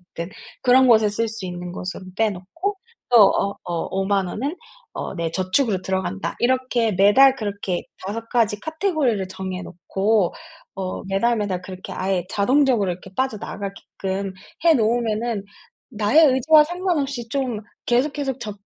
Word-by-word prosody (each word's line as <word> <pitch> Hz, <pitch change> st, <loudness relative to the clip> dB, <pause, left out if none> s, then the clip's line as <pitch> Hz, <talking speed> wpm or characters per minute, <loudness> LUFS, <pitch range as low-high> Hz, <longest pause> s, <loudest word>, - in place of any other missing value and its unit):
됐든 170 Hz, +2 st, -5 dB, 0.3 s
그런 255 Hz, +1 st, +5 dB
곳에 220 Hz, -3 st, +5 dB
쓸 225 Hz, +3 st, 0 dB
수 220 Hz, -3 st, -5 dB
있는 180 Hz, 0 st, -6 dB
것으로 185 Hz, +1 st, -6 dB
떼 225 Hz, -1 st, +2 dB
놓고 330 Hz, -, -4 dB, 0.3 s
또 245 Hz, -, +6 dB, 0.2 s
어 200 Hz, -, +1 dB
어 170 Hz, -2 st, -2 dB
50,000 195 Hz, 0 st, 0 dB
원은 275 Hz, -, -3 dB, 0.4 s
어 -, -, -5 dB
내 165 Hz, -2 st, -2 dB
저축으로 190 Hz, +3 st, +1 dB
들어간다.' 190 Hz, +1 st, -2 dB
이렇게 250 Hz, -2 st, +1 dB
매달 210 Hz, +9 st, +6 dB
그렇게 200 Hz, -6 st, -3 dB, 0.2 s
5 230 Hz, +3 st, -5 dB
가지 225 Hz, -4 st, +1 dB
카테고리를 315 Hz, -, 0 dB
정해 185 Hz, 0 st, -5 dB
놓고 190 Hz, +3 st, 0 dB, 0.4 s
어 190 Hz, -1 st, -4 dB
매달 195 Hz, +5 st, +1 dB
매달 200 Hz, -4 st, -2 dB
그렇게 185 Hz, 0 st, -9 dB
아예 185 Hz, -2 st, -1 dB
자동적으로 240 Hz, -1 st, +2 dB
이렇게 185 Hz, +2 st, -9 dB
빠져나가게끔 200 Hz, -5 st, -4 dB, 0.3 s
해 335 Hz, -1 st, +6 dB
놓으면은 225 Hz, -2 st, 0 dB, 0.5 s
나의 230 Hz, +7 st, +4 dB
의지와 285 Hz, +4 st, +5 dB
상관없이 300 Hz, -8 st, -2 dB
좀 255 Hz, -4 st, -1 dB, 0.3 s
계속, 255 Hz, +5 st, +2 dB
계속 270 Hz, -3 st, -3 dB
적 210 Hz, -2 st, -5 dB
215 Hz, 300 characters per minute, -22 LUFS, 190-260 Hz, 0.5 s, 또